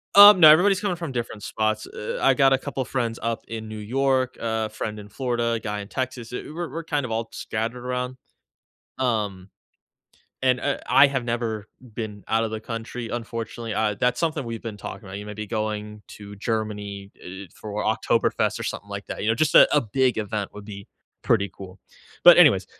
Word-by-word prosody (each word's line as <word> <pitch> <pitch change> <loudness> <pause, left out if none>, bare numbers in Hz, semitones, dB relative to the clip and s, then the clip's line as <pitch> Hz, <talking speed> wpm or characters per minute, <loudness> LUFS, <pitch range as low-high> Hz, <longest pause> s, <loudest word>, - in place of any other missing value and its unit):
Um, 205 -1 +11
no, 155 - +11
everybody's 190 +5 +4
coming 200 -4 -1
from 165 -6 -5
different 120 -3 -4
spots, 110 +1 -1
e - - -13 0.2
eh, - - -5
I 135 - +5
got 135 0 +4
a 135 - +5
couple 135 0 -4
friends 120 -3 -2
up 115 0 -3
in 110 -1 -6
New 110 - -6
York, 130 +4 0
a 110 -1 -1
friend 110 0 -5
in 105 - -10
Florida, 120 0 -1
a 115 - -1
guy 105 -1 -4
in 100 - -7
Texas; 125 0 -4
eh, - - -4
we're 170 0 -4
we're 165 - -5
kind 145 -4 -1
of 120 - -6
all 115 0 -2
scattered 115 +3 -4
around. 125 0 -3 0.8
Um, 105 -7 -1 0.9
and, 125 -1 +3
eh, 140 +1 -1
I 140 +1 +7
have 135 -2 -2
never 115 -3 -2 0.3
been 105 -3 -5
out 115 +1 +2
of 110 - -3
the 110 - -3
country, 115 +1 -6
unfortunately. 115 -1 -5
Uh, 105 0 0
that's 125 0 +1
something 160 -4 0
we've 115 -1 -5
been 110 -3 -6
talking 105 - -8
about, 95 +1 -6
you 100 - -7
know, - - -11
maybe 105 0 -5
going 105 -1 -3
to 105 -1 -10
Germany, 105 -2 -4
eh, 95 +2 -8
for 105 0 -5
Oktoberfest - - +1
or - - -4
something 100 - -5
like 100 0 -6
that, - - -5
you - - -1
know, 115 - +3
just 155 +5 +1
a - - +9
a 150 - +5
big 125 +3 +1
event 105 -1 -3
would 105 0 -10
be 100 -1 -9 0.4
pretty 100 -4 +2
cool, 95 0 -11 0.4
but - - +10
anyways, - - +6
115 Hz, 210 wpm, -24 LUFS, 105-130 Hz, 0.9 s, Um